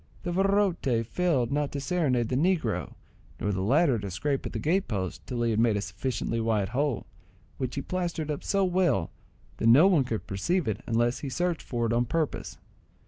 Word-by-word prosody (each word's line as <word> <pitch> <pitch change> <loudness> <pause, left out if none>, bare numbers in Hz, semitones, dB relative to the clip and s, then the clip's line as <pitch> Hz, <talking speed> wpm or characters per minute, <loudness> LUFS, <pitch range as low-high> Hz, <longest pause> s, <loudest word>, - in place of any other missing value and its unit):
The 175 - -2
virote 185 - +1
failed 140 -3 0
not 145 0 0
to 140 - -2
serenade 135 -7 0
the 125 - 0
negro, 130 - 0 0.4
nor 105 - 0
the 95 -1 -1
latter 135 - +3
to 100 -1 -5
scrape 135 +9 -2
at - - -7
the - - -4
gate 185 +5 +1
post 95 -4 -4
till 120 -2 -2
he 115 - +2
had 110 - 0
made 115 -3 +3
a - - -1
sufficiently 115 0 -3
wide 110 -4 +1
hole, 135 -5 -1 0.5
which 130 -2 -3
he 140 - -3
plastered 170 -4 -2
up 145 - -4
so 195 -1 +1
well, 175 - +1 0.5
that 115 - +1
no 130 +9 +8
one 180 -8 +4
could 115 -4 -4
perceive 160 - -1
it 105 -2 -2
unless 120 +1 +1
he 140 - -5
searched 175 +4 -1
for 120 -2 -2
it 115 - 0
on 120 +1 +2
purpose. 155 +4 -2
130 Hz, 200 wpm, -28 LUFS, 115-170 Hz, 0.5 s, no